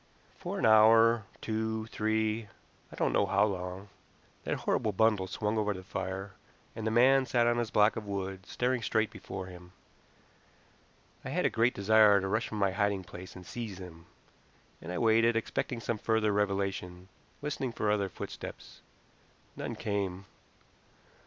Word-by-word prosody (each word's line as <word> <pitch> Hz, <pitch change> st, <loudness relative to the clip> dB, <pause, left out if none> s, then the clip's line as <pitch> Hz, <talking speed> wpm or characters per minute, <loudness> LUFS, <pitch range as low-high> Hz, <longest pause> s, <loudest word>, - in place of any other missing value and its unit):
For -, -, -4 dB
an -, -, 0 dB
hour 110 Hz, +1 st, +6 dB, 0.2 s
two, 110 Hz, 0 st, -2 dB
three, 110 Hz, 0 st, -1 dB, 0.4 s
I -, -, -10 dB
don't -, -, 0 dB
know 100 Hz, -, +2 dB
how 100 Hz, +2 st, +3 dB
long 95 Hz, 0 st, -5 dB, 0.6 s
that -, -, 0 dB
horrible 110 Hz, -, 0 dB
bundle 105 Hz, -2 st, +2 dB
swung 105 Hz, +3 st, -1 dB
over 105 Hz, -1 st, 0 dB
the 95 Hz, -, -8 dB
fire, 95 Hz, +1 st, -5 dB, 0.4 s
and 110 Hz, -1 st, -4 dB
the -, -, +3 dB
man 130 Hz, +4 st, +4 dB
sat 120 Hz, -2 st, +2 dB
on 120 Hz, 0 st, +2 dB
his 120 Hz, -2 st, -1 dB
block 105 Hz, +1 st, +4 dB
of 110 Hz, -2 st, -6 dB
wood, 95 Hz, -2 st, -4 dB
staring 125 Hz, 0 st, 0 dB
straight 110 Hz, -1 st, 0 dB
before 95 Hz, -1 st, -7 dB
him. 90 Hz, -1 st, -12 dB, 1.5 s
I -, -, -6 dB
had -, -, 0 dB
a -, -, +2 dB
great 115 Hz, +2 st, +2 dB
desire 105 Hz, 0 st, +5 dB
to 95 Hz, -, -3 dB
rush 110 Hz, +4 st, 0 dB
from 110 Hz, -, -6 dB
my 100 Hz, -2 st, +2 dB
hiding 100 Hz, 0 st, 0 dB
place 90 Hz, +1 st, -10 dB
and 90 Hz, -1 st, -11 dB
seize 110 Hz, -4 st, -6 dB
him, 85 Hz, -2 st, -11 dB, 0.7 s
and 85 Hz, -, -7 dB
I 90 Hz, -, -3 dB
waited, 115 Hz, 0 st, +4 dB
expecting 115 Hz, +2 st, -2 dB
some 115 Hz, -1 st, -3 dB
further 110 Hz, -2 st, +1 dB
revelation, 95 Hz, -3 st, -2 dB, 0.4 s
listening 140 Hz, -4 st, -2 dB
for 105 Hz, -2 st, 0 dB
other 100 Hz, -2 st, 0 dB
footsteps. -, -, -9 dB, 0.7 s
None -, -, -5 dB
came. 100 Hz, -2 st, -3 dB
105 Hz, 160 wpm, -30 LUFS, 95-110 Hz, 1.5 s, hour